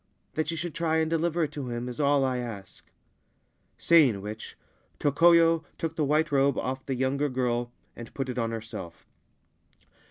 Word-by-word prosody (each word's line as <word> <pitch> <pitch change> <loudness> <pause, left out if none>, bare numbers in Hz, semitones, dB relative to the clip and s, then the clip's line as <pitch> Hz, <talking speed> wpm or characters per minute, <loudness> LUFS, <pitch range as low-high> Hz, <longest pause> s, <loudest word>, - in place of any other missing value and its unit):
That 155 0 -1
you 165 - -2
should 170 0 -4
try 165 -1 0
and 160 0 +1
deliver 165 +1 +1
it 150 - -2
to 140 -4 -5
him 120 +1 -4
is 125 -1 -7
all 140 -1 +3
I 130 -1 -1
ask.' 105 -6 -8 0.9
Saying 145 -11 +4
which, 105 +2 -8 0.4
Tokoyo 165 +2 +4
took 165 -1 -3
the 155 - 0
white 155 +2 +1
robe 140 0 +3
off 130 +1 -3
the 135 - -1
younger 135 +3 0
girl 120 -2 -1 0.2
and 120 - -9
put 135 -2 -2
it 125 -1 -3
on 115 -1 0
herself. 110 -7 -7
140 Hz, 170 wpm, -27 LUFS, 120-160 Hz, 0.9 s, Saying